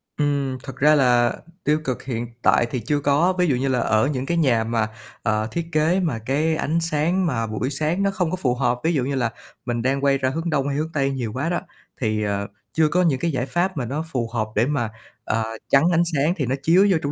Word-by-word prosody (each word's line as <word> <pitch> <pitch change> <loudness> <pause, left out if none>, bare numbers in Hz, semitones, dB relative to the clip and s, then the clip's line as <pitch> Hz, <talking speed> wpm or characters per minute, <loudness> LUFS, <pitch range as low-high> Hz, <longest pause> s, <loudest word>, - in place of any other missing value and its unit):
Ừm. 140 -3 0
Thật 135 - -8
ra 150 +2 +5
là 120 -3 +4 0.3
tiêu 150 +1 +2
cực 130 -3 -3
hiện 120 -2 -3
tại 120 - +4
thì 125 - -1
chưa 145 +6 0
có. 145 +6 +2
Ví 180 -1 +3
dụ 135 - +2
như 135 +2 -1
là 130 -2 +1
ở 110 +2 +2
những 135 -3 -2
cái 170 +2 -1
nhà 120 -8 +3
mà, 115 -1 0 0.4
ờ, 110 0 0
thiết 170 -1 -2
kế 160 +5 +2
mà 150 -11 -1
cái 155 +4 +1
ánh 160 +2 0
sáng 165 +4 +1
mà 115 -7 -1
buổi 110 +5 -2
sáng 155 +7 -1
nó 195 - +2
không 180 -4 -1
có - - 0
phù 125 -7 0
hợp, 125 -1 0
ví 165 +1 +2
dụ 135 -5 +1
như 140 +1 -2
là 120 -3 0 0.3
mình 120 -1 -1
đang 135 +2 0
quay 140 -1 +4
ra 130 -1 0
hướng 165 +5 -3
đông 140 -3 0
hay 140 0 -1
hướng 160 +2 -2
tây 135 -2 +1
nhiều 120 -5 -3
quá 140 +6 -2
đó 175 - 0 0.4
thì, 110 -2 0
ờ, 100 -1 -1 0.3
chưa 160 -1 +3
có 180 +3 +2
những 145 -7 +2
cái 170 +2 0
giải 125 -2 -1
pháp 175 +3 -1
mà 125 - -1
nó 150 +7 -3
phù 120 -3 -1
hợp 110 -2 0
để 115 +3 +3
mà, 130 -6 -1 0.3
ờ, 110 0 0 0.3
chắn 140 +2 +5
ánh 170 0 +4
sáng 150 +4 +2
thì 140 - 0
nó 130 +3 0
chiếu 185 +5 +5
vô 170 - +4
trong 145 - -1
140 Hz, 260 wpm, -22 LUFS, 120-160 Hz, 0.4 s, ra